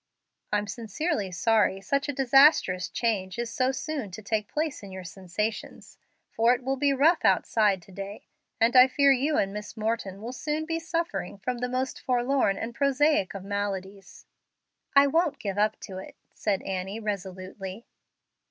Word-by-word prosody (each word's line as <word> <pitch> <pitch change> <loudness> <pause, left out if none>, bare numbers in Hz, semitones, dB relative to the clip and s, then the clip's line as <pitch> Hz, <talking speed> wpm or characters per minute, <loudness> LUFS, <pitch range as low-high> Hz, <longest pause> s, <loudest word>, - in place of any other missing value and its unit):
"I'm 210 0 +1
sincerely 220 - -3
sorry 210 +1 +2
such 275 +9 -1
a - - -1
disastrous 270 - +4
change 195 -6 -1
is 235 -1 -3
so 255 0 +2
soon 280 -4 -4
to 220 - -8
take 210 0 -1
place 305 -1 -2
in 200 -2 -10
your 190 0 -7
sensations, 190 +5 -5 0.3
for 230 +2 +4
it 250 - -9
will 265 +2 0
be 280 +1 +2
rough 295 +6 +3
outside 205 -5 +3
to 195 - -17
day, 195 +2 -8 0.3
and 230 +2 +3
I 255 0 +9
fear 280 +1 +4
you 280 +3 +2
and 195 0 0
Miss 210 +2 -7
Morton 215 -3 -2
will 235 +4 -6
soon 305 +3 -2
be 330 0 -2
suffering 330 - -3
from 245 +5 -3
the 250 +1 -2
most 255 +1 -2
forlorn 250 -4 +1
and 230 +3 -4
prosaic 280 -5 +2
of 195 - -6
maladies." 195 -1 -5 0.7
"I 280 0 +8
won't 320 +2 +1
give 200 -1 -3
up 215 +1 +1
to 185 -1 -7
it," 190 - -10 0.2
said 200 -3 -1
Annie, 190 +2 -4
resolutely. 190 0 -6
225 Hz, 170 wpm, -27 LUFS, 195-270 Hz, 0.7 s, I